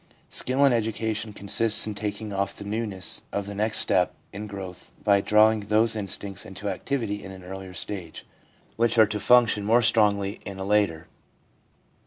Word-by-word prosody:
Skill 130 +3 +2
in 135 - +4
education 110 -1 -2
consists 105 +2 +3
in 105 - -4
taking 105 0 -5
off 100 0 -2
the - - -9
newness 105 -3 -3
of 100 -1 -2
the 100 - -6
next 105 +2 0
step 90 -1 +2 0.2
in 105 +2 -6
growth, 95 -3 -8
by 100 -1 +4
drawing 110 +2 +4
those 110 +2 +2
instincts 100 -1 -2
into 100 +2 -8
activity 105 0 -3
in 95 - -8
an 95 -1 -11
earlier 95 0 -8
stage, 90 -2 -7 0.5
which 115 +1 +2
are 110 - +8
to 105 0 -3
function 115 -1 +4
more 115 +4 +3
strongly 105 -2 +2
in 100 - -7
a 95 - -5
later. 100 -5 +1
105 Hz, 170 wpm, -25 LUFS, 100-110 Hz, 0.5 s, are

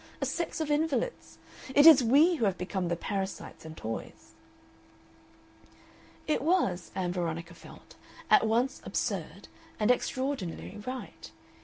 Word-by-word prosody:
A - - -1
sex 340 - -3
of 310 -2 -2
invalids. 320 - -1 0.4
It 290 - +7
is 310 -6 +9
we 290 +9 +5
who 230 - +1
have 190 -2 0
become 180 0 -3
the 170 - 0
parasites 190 -1 -5
and 160 0 -9
toys." 115 +1 -7 1.9
It 310 - 0
was, 270 - +1
Ann 180 -2 -1
Veronica 170 -1 -3
felt, - - -15 0.3
at - - +5
once 240 +4 0
absurd - - -3 0.3
and 215 +3 +4
extraordinarily 250 -7 -3
right. 255 0 -7
220 Hz, 130 wpm, -29 LUFS, 180-285 Hz, 1.9 s, is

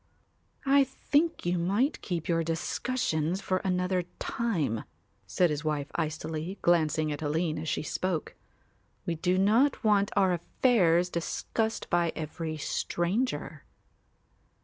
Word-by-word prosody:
"I 275 0 +6
think 290 - 0
you 175 0 +1
might 205 - +1
keep 170 -4 -3
your 165 -1 +2
discussions 165 0 -1
for 190 -1 0
another 180 -1 0
time," 175 - -1 0.4
said 175 -3 +2
his 150 0 -2
wife 150 -2 -2
icily, 160 +4 -3
glancing 155 -2 +2
at 145 - -4
Aline 155 +1 0
as 160 0 -3
she - - -1
spoke; 175 +1 -2 0.7
"we 170 - 0
do 180 +3 +1
not 225 +10 +3
want 205 -2 +3
our 190 -2 +4
affairs 175 -1 +3
discussed 220 +6 -2
by 170 -2 +2
every 160 0 -4
stranger." 185 - -2
175 Hz, 125 wpm, -29 LUFS, 160-205 Hz, 0.7 s, I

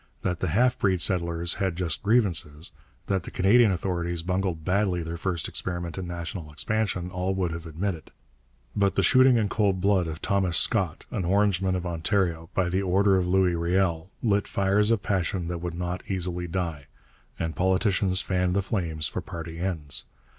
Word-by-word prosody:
That 90 -2 -1
the 95 - -1
half 120 +9 +2
breed 95 -3 +2
settlers 85 -1 +1
had 95 -3 0
just 85 -2 -1
grievances, 90 -9 +1 0.3
that 95 -2 0
the - - -8
Canadian 105 +3 +4
authorities 85 -2 -2
bungled 90 -3 -2
badly 95 -2 +1
their 80 +1 -5
first 85 0 -2
experiment 85 -2 -4
in 95 -2 -5
national 85 -2 -6
expansion, 90 +3 -1
all 90 +1 -1
would 90 -3 -1
have 85 0 -6
admitted. 80 0 -4 0.7
But 100 -2 +2
the 100 - +2
shooting 130 +6 +6
in 110 -2 +1
cold 100 -3 +1
blood 95 -2 +2
of 80 0 -5
Thomas 95 -3 +1
Scott, - - +1
an 95 - -2
Orangeman 95 0 +2
of 90 -1 -3
Ontario, 85 -1 -1
by 95 -2 +2
the 90 +2 0
order 95 +1 +3
of 90 -1 +1
Louis 90 -1 +3
Riel, 85 0 0
lit 105 -3 +2
fires 100 +2 +2
of 115 -4 +1
passion 90 -3 -1
that 90 -1 -3
would 85 -1 -4
not 90 +1 -3
easily 90 -2 -2
die. 85 -5 -3 0.5
And 80 -1 -3
politicians 95 0 +2
fanned 90 -1 0
the 100 - +1
flames 80 -7 -1
for - - -4
party 85 -2 -7
ends. 80 -6 -3
90 Hz, 175 wpm, -26 LUFS, 85-95 Hz, 0.7 s, shooting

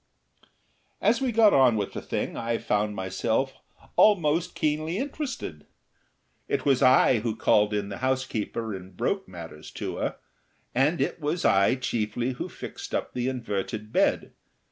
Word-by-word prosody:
As 235 +4 +2
we 260 -2 +1
got 220 -2 +5
on 130 -4 +5
with 100 -2 -2
the - - -4
thing - - -3
I 115 0 -1
found 105 0 0
myself 110 +8 -1 0.4
almost 170 -5 +3
keenly 155 +3 0
interested. 265 - -5 0.8
It - - -1
was 135 -2 +3
I 130 -2 +5
who 110 0 -2
called 105 -1 +3
in 105 -1 -2
the 100 - -6
housekeeper 125 -4 -2
and 95 -1 -9
broke 190 - -1
matters 80 -3 -9
to - - -4
her, - - -2 0.6
and 145 +6 +2
it - - -1
was 155 +4 -1
I 100 +5 +4
chiefly 120 -1 -1
who 125 - -5
fixed - - -7
up - - -2
the 125 0 -1
inverted 110 -3 -4
bed. - - +2
120 Hz, 150 wpm, -26 LUFS, 105-150 Hz, 0.8 s, got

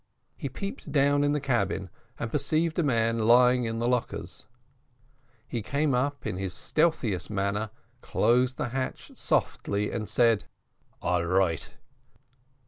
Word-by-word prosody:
He - - -5
peeped 195 0 -6
down 145 0 +3
in 145 - +2
the 150 - +1
cabin, 100 -9 -1 0.3
and 115 - -4
perceived 160 +3 0
a - - +5
man 115 -5 +1
lying 125 +1 +5
on 115 - -3
the 120 +1 0
lockers; 125 -3 -2 1.0
he 120 - -3
came 140 +5 0
up 140 +3 -1
in 90 - -2
his 95 -1 -3
stealthy 155 - +1 0.2
manner, 100 +2 -1 0.3
closed 125 +2 +2
the 120 - -2
hatch 130 +1 -4
softly, 105 +1 0
and 110 -2 -3
said, 115 -3 +3 0.6
"all 90 -1 +1
right." 90 -2 0
120 Hz, 135 wpm, -28 LUFS, 105-140 Hz, 1.0 s, a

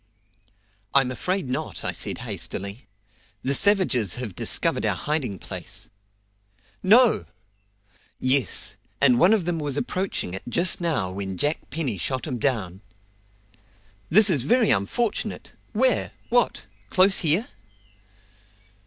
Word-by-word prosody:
"I'm 135 -2 +4
afraid 180 +5 -2
not," 130 +1 -4
I - - +1
said - - -2
hastily. 100 +3 -4 0.6
"The 135 - +1
savages 140 - +3
have 120 -6 -6
discovered - - +2
our - - +1
hiding 140 -10 -2
place." - - -7 0.9
"No!" 215 - +5 0.9
"Yes; 130 -3 +2 0.2
and 125 -3 +4
one 180 - +5
of 215 -6 +2
them 170 -2 -1
was 145 -2 -1
approaching 185 - -3
it 95 - -5
just 175 +7 +1
now 150 - -1
when 95 -1 -5
Jack 145 +3 -2
Penny 130 - -3
shot 130 +7 -2
him 130 -5 -4
down." 105 -8 -2 1.3
"This 215 +4 +6
is 145 -7 +2
very 230 - +2
unfortunate! 205 - -1 0.2
Where? - - +1 0.2
What! - - +1 0.2
close 190 +1 +4
here?" 170 +7 +2
140 Hz, 120 wpm, -24 LUFS, 115-185 Hz, 1.3 s, This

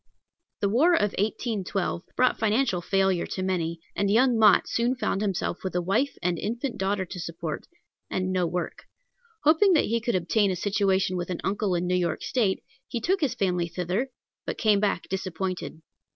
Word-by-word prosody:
The 200 - +2
war 310 - +4
of 210 -10 +2
1812 200 -4 -1
brought 255 0 +2
financial 220 -3 +1
failure 190 -1 +1
to 185 - -3
many, 170 -3 -1 0.2
and 200 0 +1
young 245 +4 +4
Mott 215 -4 +5
soon 240 +2 +1
found 205 -5 -1
himself 195 -3 -1
with 190 -1 -4
a 180 - +2
wife 225 +10 0
and 175 -1 0
infant 235 +4 -3
daughter 190 0 0
to 180 +1 -8
support, 165 -2 -5 0.4
and 185 0 -1
no 180 -2 +1
work. 180 +1 -4 0.6
Hoping 320 +6 +5
that 310 - +4
he 230 +1 0
could 235 -2 0
obtain 195 +4 +2
a 185 - 0
situation 190 -1 +1
with 175 0 -4
an 180 - -3
uncle 195 -1 0
in 175 +1 0
New 180 - 0
York 180 -2 0
State, 210 -7 0 0.2
he 235 - -3
took 375 - 0
his 285 -5 +1
family 180 -3 0
thither, 180 +9 -2 0.4
but - - -3
came 215 -3 +3
back 205 -1 0
disappointed. 185 -3 -4
195 Hz, 180 wpm, -26 LUFS, 180-230 Hz, 0.6 s, Mott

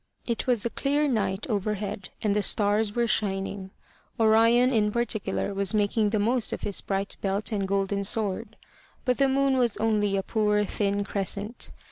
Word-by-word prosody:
It 235 0 -2
was 240 -3 +2
a 235 - -1
clear 290 +2 +1
night 200 -6 -1
overhead, 205 -2 -3
and 205 -2 +1
the 210 - +2
stars 205 +1 +2
were 240 0 +2
shining. 195 -3 -2 0.5
Orion 230 +3 +5
in 210 -2 +2
particular 220 -3 -2
was 195 +1 +1
making 210 +1 +2
the 215 - 0
most 230 +3 +1
of - - -5
his 200 - -1
bright 195 0 -3
belt 200 +3 -1
and 200 -3 -1
golden 200 0 0
sword. 215 +1 -3 0.5
But 250 0 +1
the 275 -1 +4
moon 270 0 +2
was 240 -3 +1
only 210 -3 +1
a 195 - -1
poor 210 0 +1
thin 200 0 -1
crescent. 200 +3 -3
210 Hz, 170 wpm, -26 LUFS, 200-230 Hz, 0.5 s, Orion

